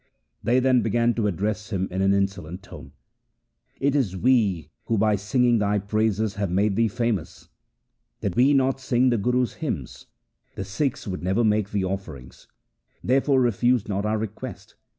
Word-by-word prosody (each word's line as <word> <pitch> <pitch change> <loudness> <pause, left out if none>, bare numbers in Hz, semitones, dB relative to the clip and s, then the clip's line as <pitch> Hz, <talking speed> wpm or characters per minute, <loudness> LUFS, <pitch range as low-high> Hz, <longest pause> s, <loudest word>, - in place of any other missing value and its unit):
They 120 +5 +2
then 130 -1 +3
began 115 +2 +1
to 110 -3 0
address 105 +3 -2
him 95 -3 -1
in 95 +1 -2
an 95 0 +3
insolent 95 -2 -2
tone: - - -12 0.4
' - - -44
It 140 +1 +1
is 105 -10 0
we 105 - +1
who 115 - 0
by 105 +1 +3
singing 120 +4 +2
thy 105 0 +1
praises 110 +1 0
have 100 -2 -1
made 100 +3 +1
thee 115 +1 +3
famous. 115 -5 -3 0.7
Did 95 -3 -3
we 135 +4 +4
not 135 0 +2
sing 130 0 +2
the 120 - +1
Guru's 125 +3 0
hymns, 90 - -5 0.5
the - - -4
Sikhs 125 +7 -2
would 90 -2 -4
never 95 +6 +1
make 105 -2 +1
thee 100 -2 -1
offerings. 85 -10 -7 0.6
Therefore 135 +2 +3
refuse 120 0 +2
not 100 0 -1
our 110 +1 0
request. 110 -1 -7
105 Hz, 170 wpm, -24 LUFS, 95-120 Hz, 0.7 s, we